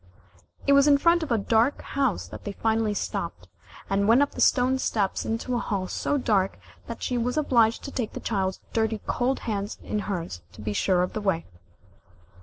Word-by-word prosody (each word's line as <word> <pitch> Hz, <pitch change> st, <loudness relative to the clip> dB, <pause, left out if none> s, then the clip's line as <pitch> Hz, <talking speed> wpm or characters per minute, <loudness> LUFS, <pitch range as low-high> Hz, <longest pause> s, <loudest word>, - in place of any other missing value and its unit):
It 280 Hz, -, +5 dB
was 280 Hz, +1 st, +6 dB
in 285 Hz, -1 st, +6 dB
front 335 Hz, +4 st, +4 dB
of 315 Hz, -, -4 dB
a 230 Hz, -, +4 dB
dark 225 Hz, +6 st, +2 dB
house 270 Hz, -6 st, -1 dB
that -, -, -9 dB
they 205 Hz, -, -5 dB
finally 220 Hz, 0 st, 0 dB
stopped, -, -, -4 dB, 0.4 s
and 200 Hz, +1 st, +1 dB
went 240 Hz, +5 st, +6 dB
up 285 Hz, -, -2 dB
the -, -, -5 dB
stone 260 Hz, +1 st, +3 dB
steps 205 Hz, -6 st, -1 dB
into 230 Hz, +3 st, -2 dB
a 240 Hz, -, +1 dB
hall 195 Hz, -5 st, -2 dB
so 290 Hz, -, -1 dB
dark 200 Hz, -7 st, +1 dB, 0.3 s
that 230 Hz, -, -7 dB
she 250 Hz, -1 st, 0 dB
was 245 Hz, +4 st, -1 dB
obliged 235 Hz, -6 st, +3 dB
to 280 Hz, -, -6 dB
take 240 Hz, -6 st, -3 dB
the -, -, -5 dB
child's 190 Hz, -4 st, -2 dB
dirty 220 Hz, -1 st, 0 dB
cold 255 Hz, +2 st, 0 dB
hands 205 Hz, -2 st, -3 dB
in 210 Hz, -, -2 dB
hers 170 Hz, -, -4 dB
to 105 Hz, -, -11 dB
be 105 Hz, 0 st, -3 dB
sure 180 Hz, -, +2 dB
of 180 Hz, -, -3 dB
the 215 Hz, -, -3 dB
way. 190 Hz, -5 st, 0 dB
225 Hz, 205 wpm, -26 LUFS, 200-255 Hz, 0.4 s, was